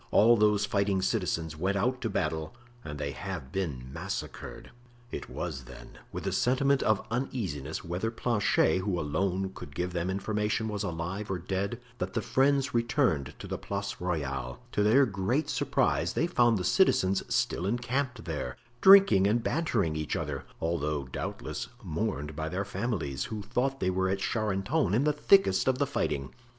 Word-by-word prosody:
All 115 +3 +6
those 105 -2 +3
fighting 100 -2 +1
citizens 80 -4 -1
went 95 +5 0
out 125 +5 0
to 115 - -1
battle 80 +2 -2 0.3
and 75 -1 -6
they 70 -1 -3
have 90 -4 -6
been 75 -10 -3
massacred." - - -6 0.4
It - - -6
was, 65 -1 -5
then, - - -12
with - - -5
a - - 0
sentiment 135 +2 +2
of 110 -2 +1
uneasiness 95 - -3
whether 90 +6 -1
Planchet, 105 -7 +2
who 95 -2 -1
alone 95 +5 -1
could 70 -5 -10
give 90 +1 -2
them 85 +1 -1
information, 105 +2 -1
was 105 -2 -3
alive 95 +2 -3
or 95 - -1
dead, 95 +6 -2 0.2
that 95 +1 -3
the - - +1
friends 140 +1 +2
returned 120 - +1
to - - -9
the - - -4
Place 100 0 -4
Royale; 70 -8 -2
to - - 0
their 115 +7 +5
great 110 - -1
surprise - - +1
they 165 - +1
found 120 -10 +3
the 90 - -2
citizens 95 - +3
still 90 - 0
encamped 120 +1 -1
there, 70 -6 -4 0.2
drinking 190 - +8
and 115 +3 +2
bantering 110 - 0
each 75 -1 -2
other, - - -3
although, 75 -3 -1
doubtless, 65 - -5 0.2
mourned 80 -4 -3
by 80 +1 -3
their 95 +4 -2
families, 95 - -2
who 110 -2 -5
thought 135 +5 -1
they 95 - +1
were 95 +1 +1
at 95 - +1
Charenton 105 - 0
in 125 - +3
the 150 0 +3
thickest 150 - +4
of 130 -1 +3
the 140 - +2
fighting. 70 - -2
100 Hz, 170 wpm, -29 LUFS, 80-120 Hz, 0.4 s, drinking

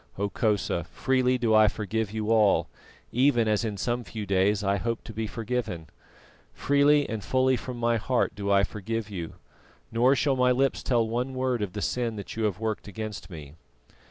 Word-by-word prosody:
Hokosa, 100 -3 0
freely 130 +5 +1
do 115 -3 +1
I 110 0 +7
forgive 105 0 -2
you 110 0 -2
all, 110 -3 +4 0.4
even 125 -2 +3
as 105 +1 +1
in 105 -3 -3
some 120 +4 -1
few 110 -2 -6
days 100 +2 +2
I 100 0 +1
hope 115 +3 -3
to 110 - -9
be 110 +1 -3
forgiven. 110 -7 -3 0.7
Freely 145 +1 +3
and 110 -2 -4
fully 130 +7 +2
from 125 0 -6
my 120 0 +1
heart 120 +2 0
do 100 -1 -4
I 100 0 +4
forgive 105 +1 -4
you, 85 -4 -5 0.6
nor 125 +4 +4
shall 135 +2 +1
my 125 0 +3
lips 135 +2 +1
tell 120 -3 +1
one 125 +4 -2
word 130 -3 0
of 100 -3 -3
the 105 - -4
sin 120 -3 -1
that 100 - -7
you 110 0 -1
have 100 -2 -1
worked 110 -2 -3
against 105 -2 -6
me." 75 -5 -10
110 Hz, 185 wpm, -27 LUFS, 105-125 Hz, 0.7 s, I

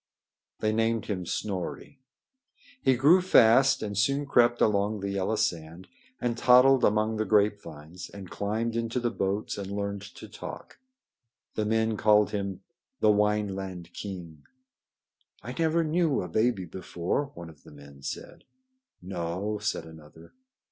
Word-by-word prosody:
They 110 0 +1
named 115 0 0
him 90 -5 -4
Snorri. 105 +7 -4 0.8
He 130 - +3
grew 150 +9 +5
fast 135 -7 +5
and 105 -1 -4
soon 140 +8 +1
crept 120 -3 +3
along 105 0 +1
the 100 0 -3
yellow 100 +2 -1
sand, 85 -1 -3 0.3
and 120 -1 -1
toddled 125 +2 +5
among 110 +1 +2
the 110 - +1
grapevines, 90 -5 -1
and 100 -2 -10
climbed 110 +5 -2
into 115 +1 -1
the 120 -1 -1
boats 100 +2 -2
and 100 0 -6
learned 100 0 -3
to - - -10
talk. - - -9 0.7
The 110 - -1
men 110 0 +1
called 105 -1 +4
him 100 -2 -3 0.4
the 110 - +5
"Wineland 95 -4 -1
king." 85 -7 -8 1.0
"I 120 +3 -6
never 165 +1 +2
knew 160 - +1
a - - -5
baby 110 +1 0
before," 90 - -3
one 85 -1 -9
of 75 - -21
the - - -16
men 70 -1 -14
said. - - -7 0.6
"No," 95 +3 -3
said 105 -5 -2
another. 80 0 -15
105 Hz, 140 wpm, -28 LUFS, 90-115 Hz, 1.0 s, grew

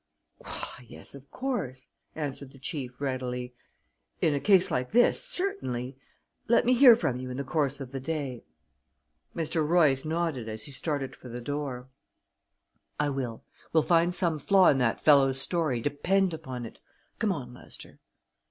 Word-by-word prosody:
"Why, 125 - -7
yes, - - -12
of 140 0 -13
course," 155 - -4 0.3
answered 140 -3 -5
the - - -14
chief 135 -4 -5
readily. 125 -2 -3 0.7
"In 155 - +2
a 140 - 0
case 190 +2 +4
like 125 +5 -2
this, 245 +1 +4
certainly. 135 - -2 0.5
Let 235 +1 +4
me 250 - +4
hear 250 -2 +8
from 130 - -1
you 130 0 -6
in 125 - -5
the 140 - -2
course 140 -1 -1
of 130 -2 -7
the 135 - -4
day." 135 -4 -4 0.9
Mr. 160 -1 0
Royce 150 -4 +3
nodded 155 -7 -2
as 110 0 -6
he - - -6
started 140 -1 -2
for 125 - -12
the 120 +1 -6
door. 135 -1 -4 1.1
"I 145 -1 +1
will; 125 -5 -4 0.3
we'll 160 -1 +4
find 170 +1 +3
some 170 -4 +1
flaw 190 +5 +5
in 135 - +3
that 120 -3 +1
fellow's 135 -3 +4
story, 155 -6 0
depend 180 +7 +1
upon 130 -7 -6
it. 115 - -11 0.4
Come 220 -3 +1
on, 130 -8 -5
Lester." 125 - -13
140 Hz, 160 wpm, -28 LUFS, 130-170 Hz, 1.1 s, hear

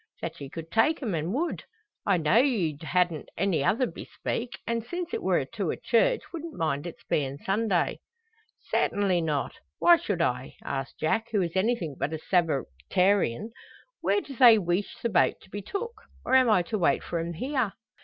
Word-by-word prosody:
"That - - -6
ye 140 - -6
could 165 +2 -8
take 290 +7 +2
'em, 215 -6 -1
an' 165 +2 -1
would. 325 +7 -2 0.4
I 195 -3 +4
know'd 175 +10 +4
you 180 - 0
hadn't 175 -1 0
any 190 -8 +1
other 230 - +2
bespeak; 240 0 -5
and 230 -1 -1
since 350 - -5
it 455 - -1
wor - - +1
to - - -3
a - - -2
church - - +2
wouldn't 330 -1 -6
mind 155 -1 -1
its 170 - -10
bein' 140 -2 -1
Sunday." 195 +1 0 0.7
"Sartinly 195 -4 +2
not. 150 -4 -2 0.2
Why 345 0 +7
should 200 - -3
I?" 125 -2 -2
asks 135 -1 -4
Jack, 225 +8 +1
who 205 -4 +2
is 170 0 -4
anything 190 - 0
but 150 - -1
a - - -1
Sabbatarian. 170 - +1 0.5
"Where 410 - +2
do 275 - -10
they 235 -3 +8
weesh 180 0 -1
the 235 - +1
boat 185 -5 +3
to 190 - -20
be 205 - -4
took? 405 - -4 0.3
Or - - -1
am 260 -2 +6
I 185 -5 +4
to 215 +4 -3
wait 175 - +2
for 170 - -3
'em 170 +1 -3
here?" 255 - -1
190 Hz, 185 wpm, -27 LUFS, 165-235 Hz, 0.7 s, they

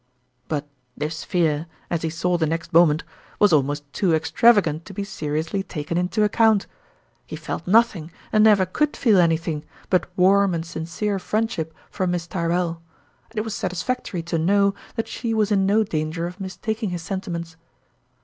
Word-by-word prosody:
But 150 -2 -2 0.3
this 155 +2 -3
fear, 165 -3 0 0.2
as 170 -2 0
he 160 - -1
saw 175 +2 0
the 165 -2 +1
next 165 +2 -3
moment, 165 -1 +5 0.3
was 205 -4 +4
almost 145 0 +2
too 175 -5 +2
extravagant 165 0 +3
to 195 - -10
be 200 - -2
seriously 160 0 -2
taken 160 -3 -5
into 180 +5 +1
account. 215 0 +3 0.6
He - - -6
felt - - -5
nothing, 200 -6 +3 0.2
and 215 0 +5
never 205 -3 +6
could 295 +11 -1
feel 215 -7 +4
anything, 165 -2 +1 0.3
but 185 - +3
warm 195 0 +4
and 165 0 -3
sin 160 -1 -6
46 - - -16
^Tourmalin's 160 - -11
cere 210 -2 0
friendship 210 -6 -2 0.2
for 185 -2 -1
Miss 175 -1 -1
Tyrrell; 170 -1 -1 0.5
and 225 - -16
it 215 - +1
was 220 -2 -4
satisfactory 190 -1 -3
to 165 -1 -1
know 200 +4 +3 0.2
that 225 - -2
she 225 -1 -3
was 215 -1 +1
in 195 -2 +3
no 215 +2 +4
danger 160 -2 -2
of 180 +3 -7
mistaking 205 +3 -3
his 175 -2 -4
sentiments. 170 -3 -5
180 Hz, 180 wpm, -23 LUFS, 165-205 Hz, 0.6 s, never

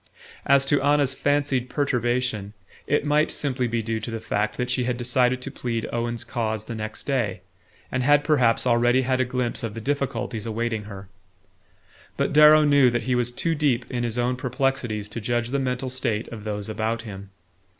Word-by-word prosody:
As 140 0 +5
to 145 0 +2
Anna's 145 -1 +2
fancied 145 -3 0
perturbation, 120 -6 -1 0.3
it 150 0 +1
might 150 +1 +3
simply 130 -3 -1
be 115 -1 -1
due 110 0 -2
to 110 - -6
the 115 -1 -4
fact 105 -1 -2
that 125 0 -2
she 125 -1 0
had 125 -1 -1
decided 125 +1 +1
to 135 - -5
plead 115 -3 -3
Owen's 120 0 -2
cause 110 -3 -3
the 115 - -6
next 110 -1 -5
day, 115 -10 -1 0.5
and 130 - 0
had 145 +3 +4
perhaps 130 -8 +2
already 120 +1 +3
had 130 0 +1
a - - +2
glimpse 125 -1 -2
of 115 -2 -4
the - - -4
difficulties 125 -3 -2
awaiting 115 -1 -2
her. 100 -2 -9 1.1
But - - 0
Darrow 150 +1 +8
knew 145 -3 +5
that 120 0 -1
he 130 - 0
was 120 -1 0
too 165 +7 -1
deep 145 -6 0
in 125 -2 -2
his 120 0 -2
own 125 +1 0
perplexities 125 -5 -1
to 115 +2 -5
judge 120 +2 -1
the 140 +2 0
mental 130 0 -2
state 120 -4 -1
of 110 -3 -9
those 105 -1 -3
about 110 +1 -2
him. 100 -3 -9
125 Hz, 190 wpm, -24 LUFS, 115-135 Hz, 1.1 s, Darrow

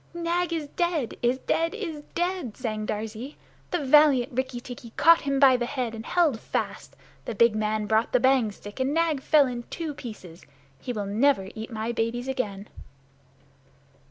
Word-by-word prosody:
"Nag 345 +1 -1
is 320 -3 -2
dead 345 -8 -1
is 245 +2 +2
dead 330 +7 -1
is 330 -9 -5
dead!" 350 - -2
sang 215 -4 -3
Darzee. 220 +6 -5 0.3
"The 345 -5 -2
valiant 270 -3 +5
Rikki 260 0 -2
tikki 240 -2 -10
caught 335 +2 +6
him 275 -1 0
by 265 -2 +7
the 240 -1 -2
head 250 -4 -3
and 220 -1 -7
held 310 -6 +2
fast. - - -4 0.3
The 230 - -4
big 230 +1 +4
man 215 0 -1
brought 220 +2 +1
the 250 - +4
bang 260 -4 +3
stick, 205 +3 -11
and 265 +3 0
Nag 325 -4 +1
fell 295 +1 +5
in 245 -2 -4
two 320 -3 -4
pieces! 210 - -10 0.4
He 250 - -5
will 210 -4 -3
never 210 -1 +2
eat 220 0 -7
my 220 +1 -3
babies 235 +2 -2
again." 210 -6 -3
255 Hz, 175 wpm, -26 LUFS, 220-295 Hz, 0.4 s, by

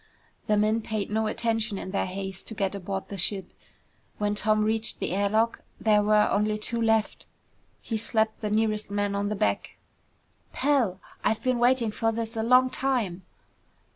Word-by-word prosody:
The 210 - +3
men 215 +2 +2
paid 215 -2 -3
no 220 0 +1
attention 225 -1 -1
in 185 - -6
their 195 - 0
haste 190 0 -6
to 220 - -6
get 195 -2 -1
aboard 195 0 -4
the 200 - -4
ship. 190 0 -1 0.6
When 205 0 0
Tom 215 +1 +2
reached 220 +1 +1
the - - -2
air 200 +2 +1
lock, 225 +2 +1 0.2
there 210 -1 +4
were 210 0 +4
only 210 +1 +1
two 230 +2 -3
left. 225 -1 +1 0.6
He 225 - -2
slapped 220 0 0
the 210 - -2
nearest 215 -1 0
man 205 0 -1
on 200 0 -1
the 210 - -1
back. - - -1 0.8
"Pal, 255 -10 +1 0.2
I've 220 - 0
been 255 -1 +1
waiting 240 -2 +3
for 225 +1 0
this 225 0 -4
a 225 - -1
long 250 +3 +4
time!" 235 -10 -1
215 Hz, 175 wpm, -27 LUFS, 205-225 Hz, 0.8 s, there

